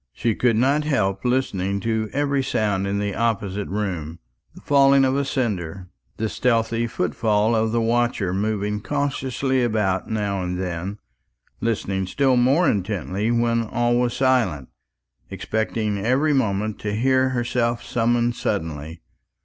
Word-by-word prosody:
She 115 - 0
could 120 +1 +2
not 135 +6 +2
help 100 -10 0
listening 100 -7 0
to 110 0 -1
every 140 -1 0
sound 105 -6 0
in 100 +1 -1
the 100 -1 -1
opposite 105 -3 -1
room 90 -6 -3 0.4
the - - -13
falling 140 -1 +5
of 130 0 +1
a 140 - +1
cinder, 95 - -3 0.3
the 110 - -1
stealthy 115 0 0
footfall 110 +2 +1
of 110 0 +1
the 115 0 +1
watcher 115 -5 +1
moving 105 +1 -1
cautiously 135 -1 -1
about 105 -5 0
now 105 -3 -1
and 90 0 -3
then; 90 +2 -4 0.6
listening 95 -4 -1
still 135 +5 +2
more 135 +8 +3
intently 100 0 -1
when 115 0 +2
all 120 +2 0
was 120 -1 0
silent, 115 - +1 0.6
expecting 110 -2 -2
every 135 +6 +2
moment 110 -5 0
to 105 -1 -3
hear 130 +3 +2
herself 120 -1 -1
summoned 120 0 +1
suddenly. 80 -5 -4
110 Hz, 140 wpm, -23 LUFS, 100-125 Hz, 0.6 s, falling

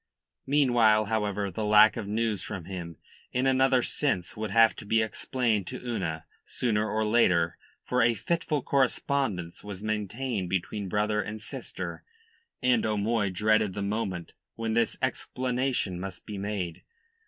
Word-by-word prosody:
Meanwhile, 120 -7 +4
however, 105 -2 -1
the 110 +5 -3
lack 105 +1 +6
of 110 -5 -4
news 110 -1 0
from 90 -4 -6
him, 85 -3 -6 0.3
in 125 +1 0
another 130 -1 +4
sense, 95 - -1
would 110 0 -3
have 115 +3 +5
to - - -8
be 115 +2 +3
explained 110 -1 -1
to - - -5
Una 80 -8 -3 0.2
sooner 110 -3 0
or 110 0 0
later 90 -7 +3 0.3
for 125 - +1
a 115 0 +4
fitful 150 - -1
correspondence 130 -9 0
was 100 -1 -7
maintained 110 -1 -2
between 95 +2 -2
brother 105 +2 +1
and 105 +2 -6
sister 105 - -6 0.6
and 125 -2 +3
O'Moy 105 0 +1
dreaded 105 +1 +2
the 100 - -2
moment 100 -4 -3 0.2
when 115 -1 -2
this 115 -1 +1
explanation 125 -7 -1
must 95 0 -7
be 105 -2 -6
made. 100 -4 -3
110 Hz, 145 wpm, -28 LUFS, 100-120 Hz, 0.6 s, lack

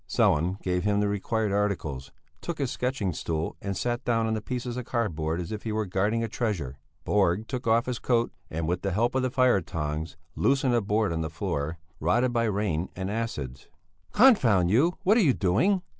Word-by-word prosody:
Sellén 90 +6 +2
gave 90 -1 0
him 105 0 +2
the 105 - +2
required 105 +1 -1
articles, 85 -10 -2 0.3
took 170 -2 -4
his 135 -4 -1
sketching 125 -8 -1
stool 80 +1 -3
and 100 -1 -3
sat 120 +1 -1
down 115 -2 +1
on 110 - 0
the 110 - -2
pieces 125 +1 -4
of 125 - -3
cardboard 85 -10 -1
as 90 +4 -5
if 105 -1 -4
he 110 - -4
were 110 0 -1
guarding 105 +5 0
a - - -1
treasure. 95 - -2 0.3
Borg 100 +1 +2
took 125 -2 -4
off 115 +1 +3
his 125 -2 -3
coat, 120 -1 +1 0.2
and 80 0 -3
with 90 +2 -1
the 95 -2 -1
help 115 +5 +1
of 130 - +1
the 130 - 0
fire 125 -5 +3
tongs 80 0 -4 0.2
loosened 135 -2 +2
a 120 - +3
board 105 -1 +1
in 80 - -2
the 80 - -2
floor, 80 0 -3 0.2
rotted 120 +10 +2
by 115 -1 +2
rain 100 -5 -1
and 95 +1 -3
acids. 75 - -4 0.4
"Confound 120 - +5
you! 155 - +3
What 210 +5 +4
are - - +5
you 145 -9 +4
doing?" 130 - +2
105 Hz, 205 wpm, -27 LUFS, 90-120 Hz, 0.4 s, Confound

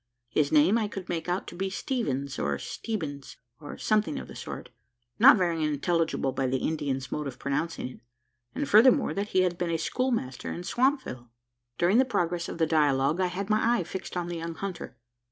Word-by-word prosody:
His 145 +4 +1
name 160 +9 +5
I 215 - 0
could 195 -2 -7
make 170 0 -3
out 180 +2 -1
to - - -9
be 190 +2 -2
Steevens, 140 - -2
or 70 -1 0
Steebins, 145 - -5 0.2
or 145 - -8
something 215 -8 +1
of - - -6
the - - -11
sort - - -7 0.5
not 255 +2 +9
very 170 -4 0
intelligible 155 -1 0
by 130 0 -1
the 130 +1 +1
Indian's 135 -3 -2
mode 150 -1 -2
of 130 - -7
pronouncing 150 +2 -2
it 130 - -11 0.6
and, 290 0 -2
furthermore, 255 +6 +5
that 200 +1 -2
he 185 - +2
had 180 -1 0
been 175 -1 -1
a 165 - +1
schoolmaster 230 - -2
in 175 - -5
Swampville. 240 - 0 0.5
During 185 +7 +4
the 265 - +5
progress 175 -7 -1
of - - -6
the 165 - +3
dialogue, 150 0 +2
I 185 - +3
had 195 +4 -3
my 225 +3 +3
eye - - -1
fixed 185 +1 -6
on 175 -1 -2
the 175 -1 -4
young 165 0 -5
hunter. 195 -1 -6
170 Hz, 200 wpm, -28 LUFS, 145-200 Hz, 0.6 s, not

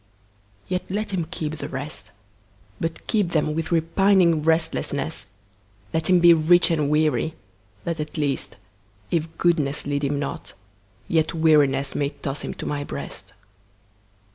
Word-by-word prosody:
Yet 180 0 -1
let 210 +2 -2
him 170 -4 -1
keep 155 -2 -4
the 145 0 -6
rest, 145 +3 -6 0.7
But 165 0 -4
keep 205 -6 0
them 155 -1 +1
with 160 +2 -3
repining 170 0 +3
restlessness; 160 - -1 0.7
Let 160 +1 0
him 180 -1 +6
be 170 0 +8
rich 170 +2 +4
and 150 -3 +1
weary, 155 0 +1 0.5
that 170 -1 -3
at 150 +1 -5
least, 140 -3 -2 0.5
If 165 -2 +1
goodness 150 -4 +1
lead 145 0 -1
him 140 +1 0
not, 140 -1 -5 0.5
yet 160 0 +1
wearinessMay 145 -3 +2
toss 140 0 -2
him - - -5
to - - -7
My 145 -1 -2
breast. - - -7
155 Hz, 140 wpm, -24 LUFS, 145-170 Hz, 0.7 s, be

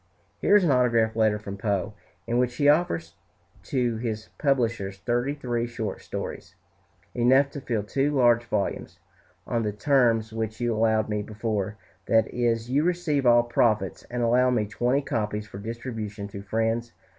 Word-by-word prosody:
Here 205 - +4
is 205 - +6
an 165 - +3
autograph 115 -3 +2
letter 110 -2 +3
from 100 -1 -7
Poe, 100 -1 -1 0.3
in 120 +1 0
which 125 -1 0
he 145 +2 +2
offers 85 - +2 0.5
to 120 -3 0
his 110 -2 -4
publishers 120 -9 0
thirty 120 +7 -1
three 120 -4 -2
short 115 -2 -5
stories, - - -6 0.6
enough 130 +3 +4
to 140 - -7
fill 115 -5 -2
two 135 +7 0
large 120 -4 +4
volumes, 105 -3 -3 0.5
"On 115 - -1
the 105 -2 -1
terms 115 -1 +2
which 110 -1 -3
you 120 -1 0
allowed 110 0 +2
me 105 -1 -1
before; 105 -1 -3 0.3
that 110 -1 +4
is, 115 -1 0
you 140 +4 +1
receive 165 -6 0
all 120 0 +6
profits 120 -2 +1
and 120 0 -2
allow 125 +2 +4
me 120 -4 +1
twenty 120 +6 0
copies 105 -4 -2
for 100 -1 -10
distribution 110 -2 -5
to 100 -1 -8
friends." 115 +3 -1
115 Hz, 165 wpm, -26 LUFS, 110-125 Hz, 0.6 s, is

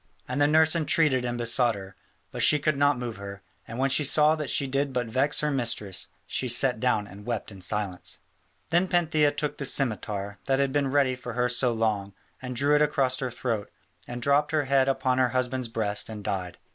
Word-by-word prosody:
And 130 +3 -2
the 145 - +5
nurse 160 +2 +4
entreated 150 -5 +2
and 120 0 -2
besought 120 0 +1
her, 95 -1 -10 0.4
but - - -4
she 150 - +5
could 155 0 0
not 145 0 +2
move 120 -3 -5
her, 100 0 -9 0.2
and 115 - -7
when 135 +1 +1
she 150 - +3
saw 150 +2 +4
that 150 -4 -5
she 140 - +1
did 135 +1 -1
but 125 -1 -1
vex 130 +6 +1
her 150 0 0
mistress, 115 -7 -3 0.2
she 130 - -2
sat 120 0 +4
down 110 -4 +1
and 100 +1 -12
wept 115 -1 -4
in 95 -2 -12
silence. 95 -1 -3 0.5
Then 175 +3 +3
Pantheia 160 -4 +2
took 150 0 -2
the - - -3
scimitar, 105 -6 -1
that 135 -1 +2
had 140 -1 +1
been 140 -1 0
ready 135 -2 +2
for 125 -1 -8
her 125 +1 +1
so 125 0 +2
long, 105 -4 -1 0.3
and 125 -1 -6
drew 140 +4 +2
it 150 - +4
across 135 -4 +1
her 130 - -2
throat, 115 -3 -3 0.4
and 120 0 -6
dropped 145 +1 +2
her 155 -1 +2
head 135 0 +2
upon 130 -1 0
her 130 -1 +3
husband's 130 0 -1
breast 110 -2 -2
and 105 -2 -7
died. 90 -3 -4
130 Hz, 215 wpm, -26 LUFS, 110-145 Hz, 0.5 s, the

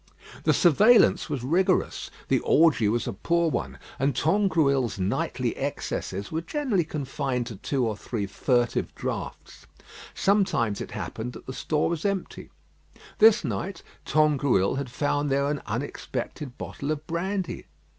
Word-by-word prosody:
The - - +5
surveillance 210 - +5
was 140 -5 -3
rigorous, 180 +7 +1 0.2
the - - +3
orgie 150 -9 +4
was 115 +1 0
a - - -2
poor 170 - +1
one, - - -3 0.2
and 135 -1 +1
Tangrouille's 155 - +2
nightly 95 +1 -1
excesses 100 +2 -4
were 160 - -1
generally 220 - 0
confined 135 -4 -3
to 115 -4 -7
two 130 +5 -1
or 110 - -2
three 105 0 -4
furtive 120 +4 0
draughts. - - -6 0.5
Sometimes 190 - +1
it - - -5
happened 125 +3 -5
that - - -11
the 130 - -6
store 150 +2 0
was 170 -2 -2
empty. 200 -2 -3 0.7
This 220 +1 +7
night 190 -3 -4 0.2
Tangrouille 140 -9 +2
had 140 -2 -3
found 145 +3 0
there 140 +1 +2
an 145 -1 -1
unexpected 125 +3 -5
bottle 140 - -6
of 155 0 -2
brandy. 185 +3 -3
145 Hz, 140 wpm, -26 LUFS, 125-170 Hz, 0.7 s, This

